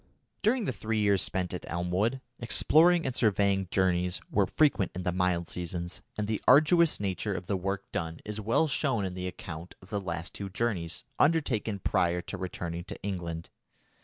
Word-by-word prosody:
During 225 +2 +2
the - - 0
three 110 0 -2
years 100 -2 +3
spent 90 -1 -1
at 90 - -5
Elmwood, 90 +9 0 0.2
exploring 165 +8 +4
and 130 -2 -2
surveying 100 -4 +2
journeys 90 -1 +1
were - - +3
frequent 145 -11 +2
in 90 - -4
the 90 - 0
mild 90 -1 0
seasons, 85 0 -5 0.2
and 105 -1 -1
the 110 -1 -1
arduous 155 +4 +6
nature 100 0 -2
of 95 - -5
the 100 - -1
work 95 +1 -2
done 80 -1 -3
is 105 0 -4
well 115 +9 +2
shown 135 -8 0
in 95 - -4
the 90 0 -4
account 85 -1 -8
of 90 - -17
the 100 -1 -1
last 85 -2 -5
two 100 -1 -5
journeys 100 -5 -2 0.2
undertaken 130 -10 +2
prior 90 -2 +1
to 90 - -6
returning 85 -2 -4
to - - -8
England. 85 -4 -4
95 Hz, 180 wpm, -29 LUFS, 90-115 Hz, 0.2 s, arduous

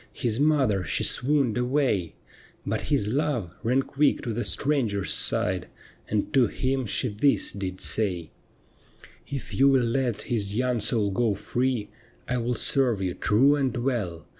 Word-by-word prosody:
His 115 -1 -1
mother 135 -10 +2
she - - -1
swooned 130 -4 +2
away; 125 - 0 0.5
But - - -1
his 105 - +1
love 125 - -1
ran 125 +4 +1
quick 145 +2 +1
to 115 - -3
the 120 +2 -2
stranger's 120 -9 0
side. - - 0 0.4
And 105 -1 -1
to 130 -4 +4
him 130 +2 -2
she 125 - 0
this 110 +7 +1
did 95 -2 -5
say: 90 -7 -1 0.3
— - - -33
' - - -18 0.2
If 140 -2 -6
you 135 +1 +4
will 130 -3 +3
let 120 -1 -1
his 105 -4 -2
young 125 0 0
soul 105 -1 +1
go 110 +1 +1
free, 115 +2 -2 0.4
I 125 - -1
will 120 +1 -1
serve 125 -2 +2
you 95 -2 -2
true 125 +10 +3
and 130 -4 -1
well. 110 - -2
120 Hz, 165 wpm, -26 LUFS, 105-135 Hz, 0.5 s, to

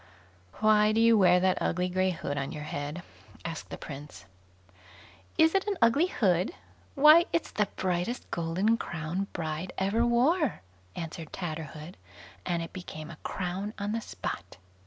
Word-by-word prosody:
"Why 215 0 +5
do 220 - +2
you 230 0 +6
wear 180 -3 +6
that 185 0 +2
ugly 180 +2 0
grey 185 +1 +1
hood 160 -5 -3
on 140 0 -3
your 150 - -6
head?" 150 +3 -5 0.4
asked 165 -1 -5
the - - -6
Prince. 145 - -9 1.1
"Is 320 0 +5
it 390 +1 +1
an 405 -2 0
ugly 245 +9 +4
hood? 190 - +1 0.4
why, 305 +4 +8
it's 335 - -1
the 210 -1 +1
brightest 185 +6 -2
golden 180 +7 +1
crown 175 +1 -3
bride 160 +1 -4
ever 200 +5 +1
wore", 255 - +2 0.3
answered 165 -1 -6
Tatterhood, 160 -1 -6 0.5
and 170 -1 0
it 165 - -9
became 155 -3 -7
a 160 - -11
crown 190 +6 -4
on 205 0 -2
the 225 +1 -1
spot. - - -6
185 Hz, 155 wpm, -29 LUFS, 165-225 Hz, 1.1 s, why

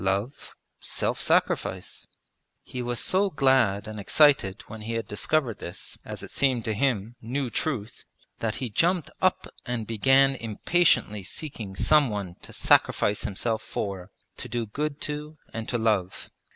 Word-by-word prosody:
Love, 100 +8 -2 0.2
self - - -2
sacrifice.' - - 0 0.6
He 125 - -6
was 120 -1 -2
so 195 +2 +2
glad 130 - +3
and 110 -1 -6
excited 100 -3 +4
when 110 0 -9
he 115 +2 -4
had 115 0 -2
discovered 125 +2 0
this, 85 - -7
as - - -7
it - - -9
seemed 130 -5 +1
to 110 - 0
him, 115 -1 0
new 125 +2 -2
truth, 115 -7 -2 0.4
that 115 -1 -1
he 125 -4 -4
jumped 170 - +1
up 185 0 +2 0.2
and 120 -3 -3
began 135 +5 +4
impatiently 115 - +2
seeking 105 -2 -6
some 150 +6 +4
one 100 -4 -4
to - - -10
sacrifice 105 0 +3
himself 110 +3 -1
for, 95 -2 -4 0.3
to - - -7
do 120 -1 -2
good 145 +7 -3
to 150 +1 -5 0.2
and 115 0 -5
to 120 - 0
love. 105 -5 0
115 Hz, 150 wpm, -26 LUFS, 105-140 Hz, 0.6 s, excited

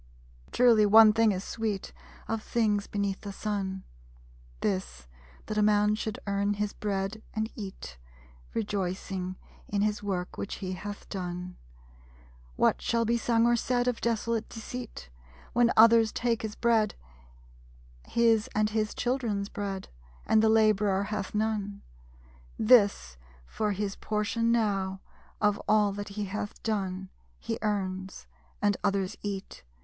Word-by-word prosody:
_Truly, 230 -4 +5
one 215 +1 +8
thing 225 -1 +4
is 190 -1 -3
sweet 215 -3 -3 0.3
Of 225 -1 -2
things 210 -3 0
beneath 200 -1 -2
the 200 - -6
Sun; 195 -2 -3 0.8
This, 65 - -2 0.4
that 215 0 -2
a - - +4
man 210 0 +4
should 215 0 -3
earn 200 0 0
his 205 0 -2
bread 200 +1 -3
and 220 +1 -1
eat, 190 - -8 0.6
Rejoicing 190 -3 -2 0.3
in 200 0 0
his 210 0 0
work 185 -3 -3
which 200 - -4
he 185 -2 -5
hath 205 +3 -7
done. 180 -1 -5 1.0
What - - +2
shall 230 0 +1
be 235 +2 +2
sung 230 0 +2
or 240 0 +4
said 245 +1 0
Of 245 -2 -1
desolate 230 -1 -1
deceit. 225 - -8 0.4
When 240 0 +4
others 225 0 +7
take 235 -1 0
his 215 -1 -5
bread; 225 -3 +2 1.1
His 230 -2 +3
and 215 0 +2
his 215 -1 -1
children's 235 -6 -1
bread? 195 -2 -4 0.4
And 220 - +4
the 220 - +4
laborer 210 -3 +3
hath 210 -1 -4
none. 210 -2 -1 0.7
This, 210 - +4 0.3
for 210 - -1
his 200 0 -3
portion 220 +2 0
now, 195 -4 0 0.4
of 210 -1 +2
all 210 -1 +4
that 205 +1 -6
he 210 - -1
hath 205 +1 -5
done. 190 -3 -2 0.3
He - - -4
earns; 190 -3 -3 0.4
and 205 -1 +3
others 200 0 0
eat. 200 -2 -5
210 Hz, 135 wpm, -29 LUFS, 195-220 Hz, 1.1 s, one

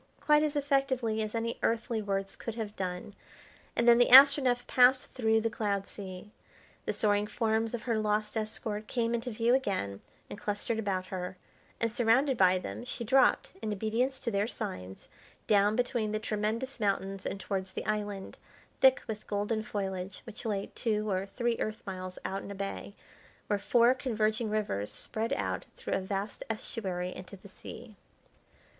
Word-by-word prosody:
quite 300 0 +4
as 300 -1 0
effectively 270 -6 +1
as 215 +1 -3
any 230 +1 -2
earthly 230 0 0
words 195 -1 -2
could 230 - -6
have 215 -3 -5
done, 185 +2 -4 0.6
and 235 - +2
then 235 0 +8
the 245 - +5
Astronef 265 -2 +8
passed 255 +1 +4
through 225 -3 +3
the 230 - +1
cloud 200 -2 -1
sea. 195 0 -9 0.6
The - - +2
soaring 205 -1 +2
forms 225 +1 0
of 230 - -7
her 230 -3 0
lost 210 0 0
escort 215 -1 -3
came 235 -1 0
into 235 +1 -2
view 230 +1 +2
again 185 - 0 0.3
and 205 - -8
clustered 210 +2 -1
about 190 -4 -1
her; 185 0 -5 0.4
and, 230 -1 0
surrounded 245 +4 +3
by 185 -4 +5
them, 185 - -6
she 245 -1 -5
dropped, 260 +3 +3
in 215 - -2
obedience 225 +6 0
to 235 - -2
their 200 +1 +1
signs, 90 - -6 0.4
down 205 0 +4
between 245 -3 0
the 215 - 0
tremendous 220 +5 -2
mountains 195 -2 -1
and 195 - -4
towards 190 -1 -3
the - - -4
island, 205 -2 -3 0.4
thick 265 0 +5
with 215 -1 -6
golden 210 +2 -1
foliage, 190 -3 -4
which 225 -1 -9
lay 200 -3 -2
two 215 -2 0
or 190 +1 -1
three 235 +2 -1
Earth 215 +1 -3
miles 185 -1 -6
out 195 +1 -2
in - - -9
a 200 - -6
bay, 200 +1 -5 0.5
where 205 - 0
four 235 +4 +4
converging 220 -3 0
rivers 200 - -1
spread 220 +1 -3
out - - -2
through - - -4
a - - +2
vast 195 +2 -4
estuary 185 -5 -3
into 185 +2 -9
the 195 - -14
sea. 220 +3 -11
215 Hz, 170 wpm, -30 LUFS, 200-235 Hz, 0.6 s, then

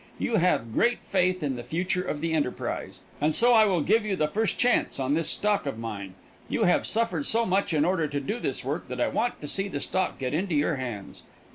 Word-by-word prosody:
You 230 - 0
have 165 - +1
great 240 - +1
faith 185 -2 +1
in 135 -3 -1
the 120 - -6
future 180 +5 -1
of 155 -5 -4
the 165 0 -1
enterprise, 145 -5 -3 0.2
and 150 +1 +2
so 240 +5 +5
I 220 -2 +7
will 185 -5 +1
give 220 +8 +3
you 210 -2 -1
the 155 -4 +1
first 215 +8 -1
chance 245 - +2
on 135 +1 0
this 165 +1 +1
stock 205 -6 +1
of 135 - -3
mine. 100 -5 -6 0.3
You - - 0
have 180 - +2
suffered 185 -10 +1
so 230 +1 +2
much 190 0 +1
in 155 -2 +2
order 170 -3 +1
to 145 0 -2
do 210 - -3
this - - -3
work - - -3
that - - -6
I - - +2
want 245 - -1
to 150 - -6
see 195 +6 -1
the 165 -7 -4
stock 185 +5 -1
get 130 0 -3
into 175 +1 -1
your 145 +1 +1
hands. 120 -7 -6
165 Hz, 240 wpm, -26 LUFS, 145-200 Hz, 0.3 s, I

